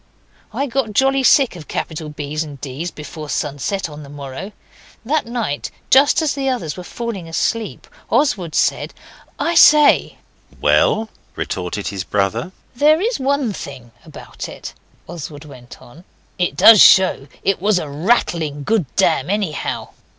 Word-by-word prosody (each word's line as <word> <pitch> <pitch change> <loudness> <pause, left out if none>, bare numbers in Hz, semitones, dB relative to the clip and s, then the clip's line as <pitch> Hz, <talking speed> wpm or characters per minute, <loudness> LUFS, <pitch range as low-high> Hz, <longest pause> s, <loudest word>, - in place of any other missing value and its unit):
I 280 - -2
got 250 -4 -2
jolly 270 +4 +2
sick 265 -3 +4
of 160 -4 -11
capital 160 -1 -4
B's 150 +1 -4
and 145 -3 -10
D's 145 +5 -5
before 150 -1 -9
sunset 150 +8 -2
on 150 -1 -10
the 140 - -11
morrow. 140 +7 -8 0.5
That 290 0 0
night, 230 -12 -3 0.2
just 280 +4 +5
as 305 - +1
the 270 -1 -2
others 185 - -3
were 180 - -8
falling 205 -5 -6
asleep, 220 +6 -2 0.2
Oswald 215 - 0
said - - 0 0.4
'I 335 - 0
say.' 300 -3 +5 0.4
'Well,' 220 0 +2 0.3
retorted 90 +2 -4
his 95 -1 -4
brother. 105 - -1 0.2
'There 300 +5 +4
is 455 +6 -1
one 270 -4 0
thing 130 -8 -9
about - - -9
it,' - - -9 0.3
Oswald 155 -3 -8
went 125 -4 -13
on, 150 +8 -16 0.4
'it 180 - -1
does 220 -3 +8
show 185 -7 +6 0.2
it 195 -3 0
was 205 -1 +2
a 160 - -3
rattling 155 -2 0
good 210 -3 0
dam 135 - +2
anyhow. 195 -7 -2
175 Hz, 150 wpm, -19 LUFS, 145-240 Hz, 0.5 s, does